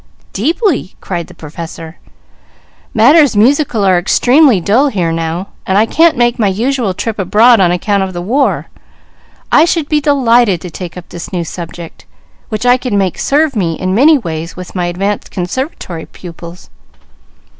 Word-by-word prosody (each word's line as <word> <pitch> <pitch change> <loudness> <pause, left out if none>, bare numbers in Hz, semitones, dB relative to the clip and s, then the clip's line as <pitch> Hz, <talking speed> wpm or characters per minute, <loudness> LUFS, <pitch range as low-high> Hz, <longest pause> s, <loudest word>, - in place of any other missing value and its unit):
"Deeply!" 310 - -1
cried 175 -3 -5
the - - -14
Professor. 165 +1 -9 0.9
"Matters 275 +2 +4
musical 245 -2 +2
are 185 -2 +3
extremely 250 - +3
dull 225 - +2
here 180 -10 -1
now, 165 +3 -3 0.2
and 190 - +1
I 215 - +4
can't 325 +5 +3
make 240 0 +1
my 215 - +2
usual 225 0 -1
trip 220 +1 -4
abroad 215 +5 +4
on 180 -2 +3
account 200 +3 0
of 190 -1 -2
the 175 - -5
war; 245 +11 0 0.9
I 305 - +6
should 330 -2 0
be 300 -1 +1
delighted 240 - +3
to 180 - -8
take 180 +1 -8
up 180 - -11
this 170 - -8
new 175 -2 -2
subject, 170 0 -9 0.4
which 215 +1 -4
I 245 0 +5
could 250 -3 -4
make 195 -3 0
serve 290 -1 +1
me 175 -6 0
in 185 +2 -2
many 295 +9 +5
ways 165 - -6
with 180 -1 -9
my 180 -2 -2
advanced 195 +4 -3
Conservatory 180 - -5
pupils." 170 0 -12
200 Hz, 165 wpm, -13 LUFS, 175-255 Hz, 0.9 s, I